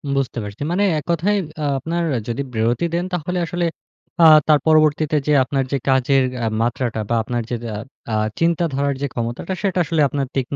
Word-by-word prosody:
বুঝতে 135 -3 -1
পারছি। 105 +5 -9
মানে 200 +3 +1 0.2
এককথায় 170 +6 0 0.3
আ - - 0
আপনার 170 +5 -2 0.2
যদি 120 +3 -2
বিরতি 115 +8 +1
দেন, 175 +1 0
তাহলে 180 +1 -2
আসলে 175 +1 -2 0.6
আ - - +7 0.2
তার 150 -2 +5
পরবর্তীতে 155 -1 +3
যেয়ে 150 -2 +4
আপনার 135 0 0
যে 140 - +1
কাজের 135 0 +3 0.2
আ - - +1 0.2
মাত্রাটা, 120 -1 -1
বা 120 - +1
আপনার 120 +1 -2
যে 120 - -1 0.2
আব 110 - -7 0.3
আ - - -1 0.3
চিন্তাধারার 160 -4 +1
যে 140 - 0
ক্ষমতাটা, 120 +10 -3
সেটা 190 -2 +1
আসলে 160 0 0
আপনার 140 0 -2
তীক্ষ্ণ 135 +1 -2
145 Hz, 180 wpm, -20 LUFS, 125-170 Hz, 0.6 s, আ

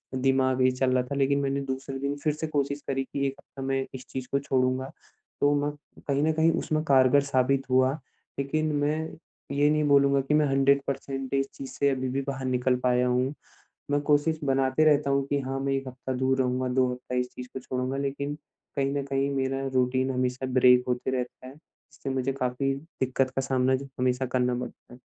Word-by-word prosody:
दिमाग़ 130 0 +2
ये 130 - +5
चल 130 0 0
रहा 125 -1 +2
था, 125 +3 -5
लेकिन 140 0 +2
मैंने 140 0 -1
दूसरे 135 0 -4
दिन 140 +1 -2
फिर 155 - +2
से 155 +2 -4
कोशिश 140 -1 -1
करी, 135 -1 0
की 140 +1 -3
1 135 - -2
हफ़्ता 135 - -12
मैं 135 0 0
इस 130 -1 -8
चीज़ 130 -1 -5
को 140 - +2
छोड़ूँगा। 130 -1 0 0.5
तो 145 0 +4
मैं 145 - 0 0.4
कहीं 140 0 +1
न 160 +1 +2
कहीं 160 +1 +3
उसमें 155 -1 -1
कारगर 135 0 +5
साबित 130 +1 +2
हुआ, 130 +1 +4 0.5
लेकिन 155 +3 0
मैं 145 +1 +1 0.6
ये 145 +1 +4
नहीं 150 0 +2
बोलूँगा 140 -1 +4
कि 135 +3 -1
मैं 150 0 +4
100 135 0 +3
परसेंट 135 -1 -4
इस 135 0 +1
चीज़ 135 - -7
से 140 - +1
अभी 130 -1 -1
भी 135 +2 -1
बाहर 135 -1 -3
निकल 125 0 +1
पाया 125 0 +3
हूँ। 125 +2 +1 0.6
मैं 145 0 +2
कोशिश 150 +2 +2
बनाते 135 +2 +2
रहता 145 -2 +4
हूँ, 140 0 +1
कि 140 0 0
हाँ 135 0 -3
मैं 135 0 -1
1 135 -1 -2
हफ़्ता 130 +1 -5
दूर 130 +1 +1
रहूँगा, 130 0 0
2 125 0 +2
हफ़्ता 125 0 -7
इस 125 0 0
चीज़ 125 0 -8
को 130 - -4
छोड़ूँगा, 130 +1 -3
लेकिन 140 +1 -2 0.4
कहीं 135 0 +1
न 140 - 0
कहीं 140 0 0
मेरा 135 0 -1
रूटीन 130 +1 +2
हमेशा 125 0 -1
ब्रेक 125 -1 +6
होते 125 +1 -1
रहता 125 +1 -6
है। 130 - -9
इससे 145 -2 -11
मुझे 135 0 0
काफ़ी 135 +1 -1
दिक्कत 135 -3 -2
का 135 - +1
सामना 130 0 +2
ज 140 +1 -8
हमेशा 125 +1 +1
करना 125 0 +1
पड़ता 120 0 -7
है। - - -14
135 Hz, 210 wpm, -27 LUFS, 130-140 Hz, 0.6 s, ब्रेक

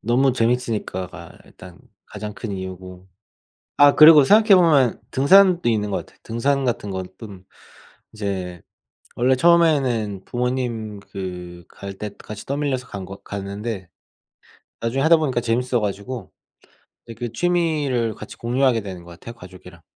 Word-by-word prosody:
너무 125 +4 +2
재밌으니까가 110 -8 -3
일단 90 -1 -15 0.3
가장 105 -1 -7
큰 110 -2 -6
이유고 95 -1 -8 0.7
아 145 0 +6
그리고 155 -1 +9
생각해 210 +6 +6
보면 150 -9 +3
등산도 180 +4 +5
있는 105 -2 0
것 - - 0
같아요. - - -11
등산 135 +5 -1
같은 115 -4 -2
건 95 -1 -4
뜸 100 -5 -11 0.7
이제 95 -5 -5 0.6
원래 130 +2 +2
처음에는 130 - +2
부모님 120 -4 -3
그 90 -3 -8
갈 100 0 -9
때 105 - -5
같이 105 -1 -10
떠밀려서 140 -2 -2
간 100 -2 -7
거 95 +1 -9
갔는데 100 0 -6 0.9
나중에 120 +4 -1
하다 165 +3 +6
보니까 140 -6 -1
재밌어 120 +1 0
가지고 105 +4 -5 0.8
예 - - -6
그 115 +1 -6
취미를 150 -8 0
같이 110 - -11
공유하게 125 0 +1
되는 95 -4 -8
것 85 - -13
같아요 115 +7 -11
가족이랑. 90 -4 -14
115 Hz, 300 characters per minute, -21 LUFS, 100-135 Hz, 0.9 s, 그리고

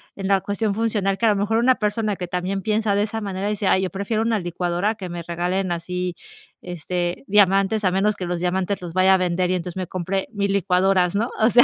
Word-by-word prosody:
en 195 -1 -4
la 195 -1 +3
cuestión 205 0 -1
funcional 210 -3 0
que 235 - 0
a 225 - +5
lo 205 - +3
mejor 210 +3 0
una 250 +2 +4
persona 210 -1 -1
que 180 -1 -5
también 180 +2 -2
piensa 215 -1 +1
de 205 - +2
esa 220 +1 -3
manera 195 -1 -3
y - - 0
dice: 205 -2 -2
"Ay, 190 - +3
yo 185 - -1
prefiero 200 +3 -2
una 225 -1 +1
licuadora, 175 +3 -1
a - - -6
que 190 -4 -7
me 175 -1 -5
regalen 175 +2 -2
así, 180 +1 -3 0.5
este, 175 - -3
diamantes 195 +1 +3
a 185 - +3
menos 200 +3 +1
que 185 - -5
los 175 0 -2
diamantes 185 +2 -1
los 170 -2 -7
vaya 185 +1 +5
a - - +3
vender, 180 0 0
y 185 - +2
entonces 180 0 -5
me 185 -2 -3
compre 190 +1 -2
mi 200 -1 0
licuadoras", 185 -1 +2
¿no?, 225 +4 0
o 220 +2 +5
sea, 245 +1 +7
195 Hz, 250 wpm, -22 LUFS, 180-210 Hz, 0.5 s, sea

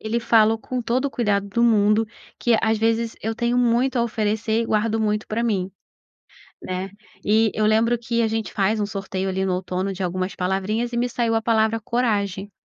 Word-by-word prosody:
ele 220 +2 -1
falou, 225 -1 +4
com 250 +2 -4
todo 250 +4 0
o - - -3
cuidado 200 -5 0
do 235 +4 0
mundo, 215 -1 +3 0.3
que 235 -2 +3
às 220 0 +2
vezes 225 +1 0
eu 225 +1 -2
tenho 235 +2 0
muito 245 +2 +2
a 235 - +3
oferecer 220 0 0
e - - -4
guardo 220 +1 0
muito 210 0 0
pra 225 +2 -1
mim, 195 -5 -1 0.9
né. 185 +1 -4 0.3
E 220 +1 +3
eu 215 - 0
lembro 225 +2 +3
que 235 0 -1
a 225 - +2
gente 220 0 -3
faz 210 +1 +1
um 205 - +1
sorteio 195 -2 -4
ali 190 0 -1
no 185 - 0
outono 185 +1 -2
de 190 - -7
algumas 185 +1 -2
palavrinhas 195 +6 -1
e - - -1
me 245 +1 0
saiu 230 -1 0
a 225 - +1
palavra 225 0 +2
"coragem". 205 -4 -1
220 Hz, 205 wpm, -22 LUFS, 200-230 Hz, 0.9 s, falou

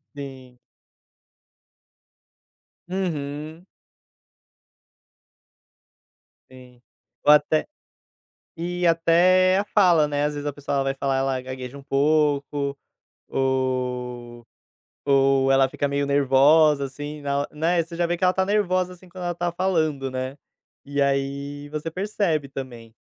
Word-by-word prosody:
Sim. 130 -3 -10 2.3
Uhum. 155 -3 -4 2.8
Sim, 125 -1 -16 0.4
ou 150 - +8
até 150 +1 +2 0.9
e 175 +1 -3
até 175 +3 +4
a - - -2
fala, 175 -7 +4
né, 145 0 -1
às 150 0 -1
vezes 145 0 -5
a - - -3
pessoa, 145 0 -5
ela 135 - +1
vai 135 0 -1
falar, 135 0 -1
ela 135 -1 0
gagueja 130 +1 -7
um - - -12
pouco, 145 0 +1 0.5
ou 125 -2 -2 0.6
ou 135 -1 +3
ela 135 0 +5
fica 140 +2 -2
meio 140 0 -1
nervosa, 140 +2 +4
assim, 145 +2 -7
na 140 0 -1
né, 165 +3 +1
você 165 +1 -9
já 175 - +1
vê 175 0 -2
que - - -20
ela 180 - +4
está 190 0 +1
nervosa, 185 -3 0
assim, 180 +1 -16
quando 180 +1 -10
ela 175 - -1
está 175 0 -2
falando, 160 -7 -1
né, 130 +1 -4 0.5
e 145 0 -2
aí 140 +1 -2
você 155 +2 -4
percebe 180 -5 -1
também. 120 -4 -8
145 Hz, 125 wpm, -24 LUFS, 135-170 Hz, 2.8 s, ou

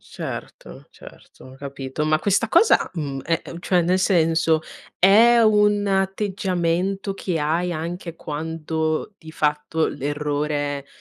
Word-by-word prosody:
Certo, - - -8
certo, 130 0 -15
capito. 140 +1 -5
Ma 155 0 +3
questa 200 +5 +1
cosa, 385 - +4
mhmm, 140 -5 -4
ehm, 165 +1 -3
cioè 180 0 +2
nel 180 +2 +1
senso, 165 -3 +2 0.4
è 225 +6 +6
un 210 -1 +3
atteggiamento 195 -1 -1
che 180 -3 -3
hai 165 +4 0
anche 170 +1 -5
quando 160 +3 -3
di 160 - -12
fatto 150 +1 0
l'errore 145 0 -2
165 Hz, 115 wpm, -22 LUFS, 150-195 Hz, 0.4 s, è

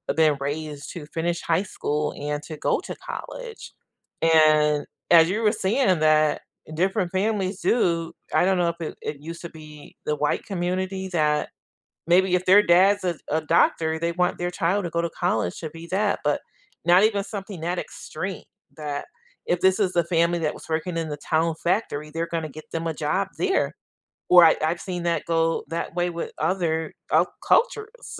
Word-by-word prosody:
been 155 -3 +4
raised 145 0 -4
to 170 -4 -7
finish 170 +2 -2
high 165 +2 +2
school 150 -6 -2
and 145 0 -3
to 155 -1 -8
go - - +1
to - - -7
college, 485 -3 -7 0.5
and 155 -2 +4 0.3
as 165 -1 +7
you 210 +4 -1
were 210 - +4
saying 200 - +1
that 155 -1 +3 0.3
different 185 +1 0
families 195 -1 -1
do 170 -8 +1 0.2
I - - +4
don't 190 0 +2
know 175 -1 +2
if 170 0 -7
it 155 - -5
it 150 - -5
used 165 +2 -8
to 170 - -7
be 155 -2 -13
the 150 - 0
white 150 - 0
community 190 0 -2
that 150 -2 +1 0.6
maybe 180 +1 +4
if 180 0 -1
their 200 +3 +7
dad's 195 +3 +4
a 175 -2 0
a 160 +1 +1
doctor, 160 +1 +2
they 170 +1 -1
want 180 +1 0
their 175 0 -1
child 185 +2 0
to - - -2
go 170 0 0
to 170 - -2
college 105 -6 0
to 160 - -4
be 165 +1 -10
that 205 +2 +1
but 145 0 +1 0.4
not 175 +3 +6
even 205 -2 +1
something 200 -3 -7
that 175 +2 -1
extreme 185 +4 -6 0.3
that 145 -2 -4 0.4
if 175 - 0
this 190 +1 +4
is 190 -3 +1
the 170 - +3
family 170 0 +2
that 155 -2 -1
was - - -12
working 165 +2 -2
in 165 -2 -2
the 150 - -4
town 160 +2 0
factory, 170 -5 -1
they're 165 +2 -2
gonna 165 -2 -3
get 155 +2 -12
them 165 0 -3
a 160 - -1
job 185 +6 -1
there, 385 0 +1 0.6
or 175 -2 +9
I 160 - +6
I've 170 +2 -1
seen 180 -3 -4
that 170 -3 0
go 165 0 +1
that 165 +1 -4
way 175 0 +1
with 170 0 -5
other, 160 -4 0 0.2
uh, - - +5 0.2
cultures. 470 0 0
170 Hz, 190 wpm, -24 LUFS, 155-185 Hz, 0.6 s, or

